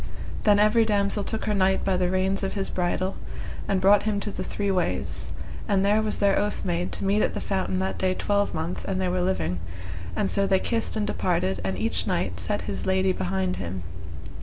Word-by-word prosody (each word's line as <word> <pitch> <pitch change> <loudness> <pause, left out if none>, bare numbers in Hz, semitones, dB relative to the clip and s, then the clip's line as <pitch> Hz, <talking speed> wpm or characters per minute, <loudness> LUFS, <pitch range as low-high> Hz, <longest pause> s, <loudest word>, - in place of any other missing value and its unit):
Then 205 -1 +6
every 215 +2 +5
damosel 205 -1 +1
took 220 +2 -2
her 210 - +1
knight 190 -1 +2
by 190 - +2
the 180 -1 +1
reins 190 +1 +1
of 195 - -2
his 195 -2 -2
bridle, 185 +1 -1 0.5
and 195 -1 +2
brought 200 +2 +6
him 215 -2 0
to 205 - -3
the 185 - -4
three 200 +1 -1
ways, 185 -2 -1 0.4
and 200 -2 +2
there 210 +2 +4
was 215 -1 -1
their 200 -1 +3
oath 205 0 -2
made 90 +2 -1
to - - -3
meet 200 +2 +3
at - - +1
the - - -1
fountain 95 0 -1
that 95 +1 -1
day 185 -1 +1
twelvemonth 190 -5 -1
an 190 - -1
they 185 -1 0
were 180 0 0
living, 90 - 0 0.6
and 95 - 0
so 200 0 +2
they 190 - +4
kissed 225 +4 0
and 215 -1 0
departed, 95 - 0
and 95 -1 -2
each 95 -3 -1
knight 90 -1 -1
set 90 +4 -1
his 100 -2 -4
lady 190 0 +3
behind 95 - -1
him. 90 0 -4
190 Hz, 210 wpm, -26 LUFS, -, 0.6 s, Then